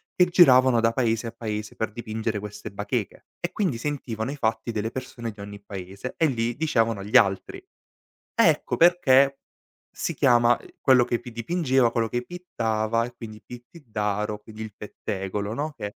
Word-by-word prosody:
che 180 - +5
giravano 130 -9 +6
da 115 0 +3
paese 115 -1 0
a - - -5
paese 105 -2 -5
per 110 - -2
dipingere 110 -1 -3
queste 105 +1 -8
bacheche 105 +2 -4
e 175 - -3
quindi 185 - -1
sentivano 120 -3 -3
i - - -5
fatti 110 -3 -1
delle 110 0 -2
persone 130 -2 -6
di 105 - -19
ogni 100 0 -9
paese 100 +4 -7
e 165 - +3
li 120 -4 0
dicevano 115 -9 0
gli 105 - -5
altri. 95 -1 +3 0.7
Ecco - - +3
perché 140 -6 +5 0.5
si - - -3
chiama 120 0 +4 0.2
quello 130 -3 +5
che 120 - -1
pi 120 - -10
dipingeva, 130 0 +1
quello 115 -1 0
che 120 +3 -2
pittava, 115 -10 -1
e 125 - -9
quindi 110 -2 -10
pittiddaro, 105 - -4
quindi 110 0 -11
il 110 -2 -6
pettegolo, 100 0 -4
no, 150 +5 -3
che 105 -5 -6
115 Hz, 165 wpm, -25 LUFS, 105-130 Hz, 0.7 s, giravano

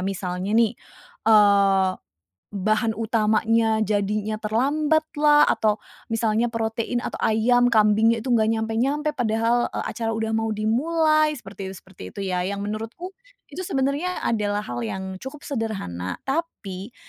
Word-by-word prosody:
Misalnya 190 +1 -2
nih, 230 -2 +4 0.6
eee, 200 -3 +5 0.6
bahan 215 +3 0
utamanya 220 0 +2
jadinya 210 +1 -1
terlambat 290 +8 +1 0.2
lah, 295 0 +6
atau 215 -1 +1 0.3
misalnya 225 0 +1
protein, 230 +1 -2
atau - - -5
ayam, 245 +3 +3
kambingnya 220 0 +3
itu 255 - -2
nggak 220 -2 +3
nyampe-nyampe 235 +7 0
padahal, 235 -2 +1
eee, - - -2
acara 225 -1 -3
udah 220 0 -2
mau 225 0 0
dimulai, 310 +7 +2
seperti 195 -5 -8
itu 190 - -8
seperti 190 0 -13
itu - - -7
ya, 180 - 0
yang 200 0 -3
menurutku 225 - -5 0.4
itu 345 - -6
sebenarnya 280 +7 -1
adalah 210 -2 0
hal 120 -7 -5
yang 190 - -5
cukup 270 +5 -9
sederhana 195 - -4
tapi 250 - -4
220 Hz, 135 wpm, -23 LUFS, 205-245 Hz, 0.6 s, lah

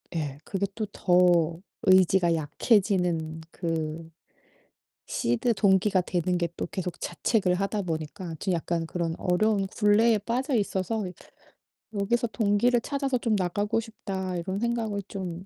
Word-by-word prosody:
예. 145 -4 -3
그게 200 0 -1
또 220 - -2
더 175 -2 +3 0.2
의지가 185 -2 +5
약해지는 165 - +1
그 165 -1 -3 1.0
seed 120 - +1
동기가 190 -1 +3
되는 180 0 -1
게 170 - 0
또 - - -2
계속 180 -2 -5
자책을 195 -6 0
하다 195 +2 -1
보니까 165 +1 -4
좀 190 -3 -1
약간 170 0 -1
그런 170 -1 -2
어려운 195 +2 +2
굴레에 215 +2 +3
빠져 250 +6 -1
있어서 205 0 -1 0.9
'여기서 235 +4 0
동기를 225 +2 +2
찾아서 275 -2 -1
좀 230 -3 0
나가고 205 +4 0
싶다.' 190 -5 -5
이런 190 +3 -3
생각을 225 -3 -1
좀 185 -2 -6
190 Hz, 275 characters per minute, -27 LUFS, 170-215 Hz, 1.0 s, 의지가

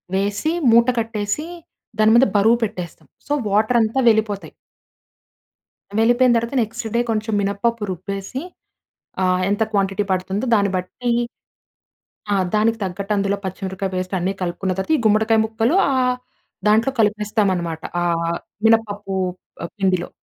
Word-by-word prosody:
వేసి 205 +10 0 0.2
మూట 235 +2 +5
కట్టేసీ, 225 +5 -2 0.5
దాని 215 0 +5
మీద 245 +3 +6
బరువు 225 +4 +4
పెట్టేస్తాం. 185 -6 -5 0.2
సో, 290 - 0 0.2
వాటర్ 215 +4 +3
అంతా 225 +4 0
వెళ్ళిపోతాయి... 215 -2 0 1.5
వెళ్ళిపోయిన 240 +2 +4
తరువాత 235 +4 -3
నెక్స్ట్ 225 +1 -4
డే 235 - +3
కొంచెం 220 0 -2
మినప 200 0 -2
పప్పు 230 -2 +1
రుబ్బేసి 195 +7 -5 0.8
ఆహ్, 185 0 +2
ఎంత 205 +2 -1
క్వాంటిటీ 195 0 0
పడుతుందో 190 +5 -1
దాన్ని 200 -2 +2
బట్టీ 185 +7 -4 1.2
ఆ! - - +3 0.2
దానికి 225 +2 +2
తగ్గట్టు 195 +2 -3
అందులో 200 0 0
పచ్చిమిరపకాయ 190 +1 -4
పేస్ట్ 185 +1 -3
అన్ని 180 +2 -1
కలుపుకున్న 180 +1 -2
తరువాత 190 +11 -1
ఈ - - -3
గుమ్మడికాయ 220 +1 +3
ముక్కలు 225 +7 0
ఆహ్, 255 -2 +1 0.5
దాంట్లో 220 +5 +4
కలిపేస్తామన్నమాట. 205 -6 0 0.2
ఆహ్, 170 -1 0 0.3
మినపప్పు 210 -3 +2 0.6
పిండిలో. 185 -3 +1
210 Hz, 130 wpm, -21 LUFS, 190-225 Hz, 1.5 s, మీద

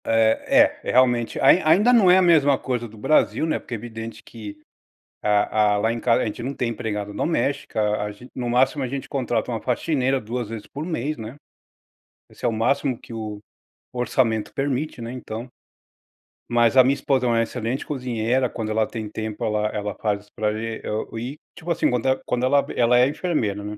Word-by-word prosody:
É, 115 - +4
é - - -2
realmente, 120 -2 +2
ain 140 +7 +6
ainda 205 +10 +5
não 215 -6 +6
é 180 - +7
a - - +5
mesma 145 -6 +5
coisa 120 -3 -3
do 110 0 -15
Brasil, 155 +7 +2
né, 160 - 0
porque 120 - -6
é - - -3
evidente 115 0 -8
que 105 -3 -9 0.7
a 105 0 +2
a - - +1
lá 110 +3 +1
em 120 - -4
casa 115 0 +2
a - - -1
gente 105 - -4
não 130 +4 -3
tem 120 - -1
empregada 105 -3 -4
doméstica, 140 -4 -1
a 105 0 0 0.3
no 120 -1 -3
máximo 130 +4 +2
a - - -1
gente 135 +2 -5
contrata 120 -3 -1
uma 115 - -3
faxineira 135 0 0
2 120 0 -4
vezes 110 -2 -7
por 145 - -7
mês, 155 -3 -2
né. 110 +3 -7 0.9
Esse - - -9
é - - +4
o - - +2
máximo 125 +3 0
que - - -14
o 110 -2 -5 0.5
orçamento 120 -3 0
permite, 135 0 -2
né, 115 +1 -5
então. 120 -1 -6 1.0
Mas 120 0 +3
a 130 - +9
minha 130 +2 +3
esposa 135 -2 0
é - - +2
uma 115 -1 +3
excelente 115 +2 -3
cozinheira, 125 -2 -1
quando 110 -2 -4
ela 110 0 +1
tem 110 -2 -5
tempo 110 +1 -4
ela 105 -1 0
ela 105 -1 -4
faz 105 -1 -2
para 105 0 0
gen 110 +1 -4
e - - -5
o 110 +1 -3
e 130 +6 -5 0.2
tipo 175 0 -9
assim, 170 - +2
quando 125 +1 0
ela 130 0 +2
quando 125 0 0
ela 140 +2 +3
ela 120 0 +4
é 125 - +5
enfermeira, 125 - -1
né. 105 +1 -6
120 Hz, 205 wpm, -23 LUFS, 110-135 Hz, 1.0 s, a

